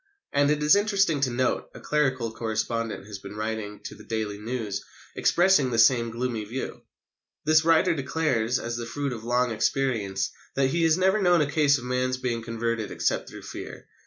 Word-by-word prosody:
And, 145 Hz, 0 st, +3 dB
it 150 Hz, 0 st, +1 dB
is 150 Hz, +4 st, +6 dB
interesting 195 Hz, -7 st, +2 dB
to 135 Hz, -, +2 dB
note, 125 Hz, +1 st, -1 dB
a -, -, -9 dB
clerical 130 Hz, -6 st, 0 dB
correspondent 115 Hz, -1 st, -2 dB
has 105 Hz, -1 st, -8 dB
been 100 Hz, -, -9 dB
writing 110 Hz, -1 st, -4 dB
to -, -, -7 dB
the -, -, -13 dB
Daily 110 Hz, -2 st, -3 dB
News 110 Hz, -2 st, -4 dB, 0.3 s
expressing 175 Hz, -7 st, +3 dB
the 115 Hz, -, -1 dB
same 115 Hz, +1 st, +5 dB
gloomy 115 Hz, -1 st, -3 dB
view. 120 Hz, +6 st, -5 dB, 0.6 s
This 155 Hz, +1 st, +5 dB
writer 165 Hz, 0 st, +4 dB
declares, 130 Hz, -5 st, 0 dB
as 120 Hz, 0 st, -4 dB
the 115 Hz, -1 st, -5 dB
fruit 140 Hz, +2 st, -3 dB
of 115 Hz, -2 st, -8 dB
long 125 Hz, +1 st, +1 dB
experience, 110 Hz, -4 st, 0 dB, 0.2 s
that 135 Hz, -1 st, +2 dB
he 170 Hz, -, 0 dB
has 160 Hz, 0 st, +4 dB
never 190 Hz, +3 st, +3 dB
known 175 Hz, -3 st, +4 dB
a 150 Hz, -1 st, 0 dB
case 145 Hz, -3 st, +4 dB
of 120 Hz, -, -8 dB
a -, -, -6 dB
man's 125 Hz, 0 st, 0 dB
being 120 Hz, -2 st, -2 dB
converted 115 Hz, -1 st, -2 dB
except -, -, -1 dB
through -, -, -10 dB
fear. -, -, -8 dB
125 Hz, 190 wpm, -26 LUFS, 115-150 Hz, 0.6 s, is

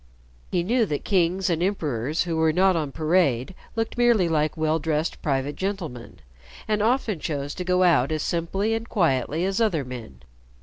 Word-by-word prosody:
He 175 Hz, -, 0 dB
knew 230 Hz, +3 st, +2 dB
that 145 Hz, -3 st, -3 dB
kings 185 Hz, -1 st, +1 dB
and 170 Hz, -2 st, 0 dB
emperors 155 Hz, -, -1 dB
who 170 Hz, -2 st, -3 dB
were 160 Hz, 0 st, +3 dB
not 185 Hz, +3 st, +3 dB
on 150 Hz, -4 st, -2 dB
parade 155 Hz, -3 st, +1 dB, 0.2 s
looked 225 Hz, +1 st, -2 dB
merely 235 Hz, -7 st, +4 dB
like 155 Hz, -1 st, 0 dB
well 160 Hz, 0 st, +1 dB
dressed 155 Hz, +1 st, -2 dB
private 140 Hz, 0 st, -1 dB
gentlemen, 175 Hz, -11 st, -5 dB, 0.5 s
and 210 Hz, -1 st, +1 dB
often 225 Hz, -5 st, +1 dB
chose 145 Hz, -2 st, -3 dB
to 180 Hz, -, -5 dB
go 180 Hz, 0 st, +2 dB
out 160 Hz, -6 st, +3 dB
as 155 Hz, -2 st, -1 dB
simply 190 Hz, +6 st, -1 dB
and 225 Hz, +1 st, -3 dB
quietly 160 Hz, -, +1 dB
as 195 Hz, +3 st, 0 dB
other 170 Hz, -11 st, +1 dB
men. 115 Hz, -, -9 dB
165 Hz, 175 wpm, -24 LUFS, 150-195 Hz, 0.5 s, merely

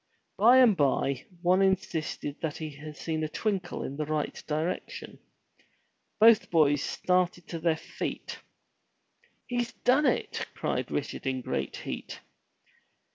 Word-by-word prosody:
By 235 Hz, +5 st, +6 dB
and 245 Hz, -6 st, +7 dB
by 135 Hz, -3 st, +1 dB, 0.2 s
one 180 Hz, +2 st, +4 dB
insisted 180 Hz, -6 st, -1 dB
that 155 Hz, -3 st, -2 dB
he 155 Hz, -1 st, -5 dB
had 150 Hz, +1 st, -10 dB
seen 160 Hz, -1 st, -2 dB
a 155 Hz, -, -2 dB
twinkle 195 Hz, 0 st, -2 dB
in 140 Hz, -, -5 dB
the 150 Hz, -, -1 dB
right 155 Hz, -1 st, -1 dB
direction. 160 Hz, +4 st, -3 dB, 1.0 s
Both 225 Hz, 0 st, +6 dB
boys 145 Hz, -4 st, +4 dB
started 180 Hz, +1 st, 0 dB
to 165 Hz, -, -4 dB
their 160 Hz, -1 st, +1 dB
feet. -, -, -5 dB, 1.1 s
"He's 240 Hz, -1 st, -2 dB
done 270 Hz, +4 st, +3 dB
it!*' -, -, -1 dB
cried -, -, -2 dB
Richard -, -, -3 dB
in 130 Hz, -1 st, -1 dB
great -, -, -3 dB
heat. -, -, -6 dB
165 Hz, 130 wpm, -29 LUFS, 150-195 Hz, 1.1 s, and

